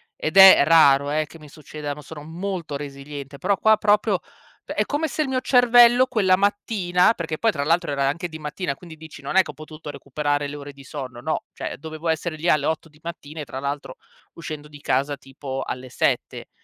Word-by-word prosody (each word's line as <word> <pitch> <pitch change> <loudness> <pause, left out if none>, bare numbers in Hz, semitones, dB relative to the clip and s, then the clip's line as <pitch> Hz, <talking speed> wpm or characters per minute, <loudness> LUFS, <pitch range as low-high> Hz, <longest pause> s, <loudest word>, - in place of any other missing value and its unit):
Ed 160 +5 -3
è 190 -6 +10
raro, 140 -3 +5
eh, 155 0 0
che 165 - -15
mi 150 -1 -14
succedano, 150 0 -7
sono 150 -1 -10
molto 170 -1 -5
resiliente, 140 0 -8
però 200 - +1
qua 220 0 +4
proprio 205 -2 +2
p - - -18
è - - 0
come 305 +2 -1
se 305 +2 -2
il - - -4
mio 255 -1 0
cervello 245 0 +6
quella 200 -7 +3
mattina, 200 -1 +2
perché 160 -4 -4
poi 225 -1 +3
tra 140 -5 -3
l'altro 165 0 +1
era 140 -1 0
anche 165 +6 -2
di 160 - -8
mattina, 150 0 -4
quindi 160 0 -13
dici, 160 -2 -12
non 140 - -4
è 190 - +8
che 150 - -8
ho - - -22
potuto 155 +1 -10
recuperare 145 +1 -2
le 145 - -7
ore 145 0 -9
di 140 0 -14
sonno, 130 -4 -7
no, 155 +4 -2
cioè - - -6
dovevo 160 +2 -7
essere 160 0 -1
lì 165 +3 -1
alle 150 -1 +3
8 160 +1 -2
di 150 0 -23
mattina 160 -2 -8
e 145 - -6
tra 130 +2 -7
l'altro 140 -1 -4 0.4
uscendo 155 -3 -7
di 145 -1 -13
casa 140 +2 0
tipo 135 0 -7
alle 130 0 -6
7. - - -1
155 Hz, 215 wpm, -23 LUFS, 145-185 Hz, 0.4 s, è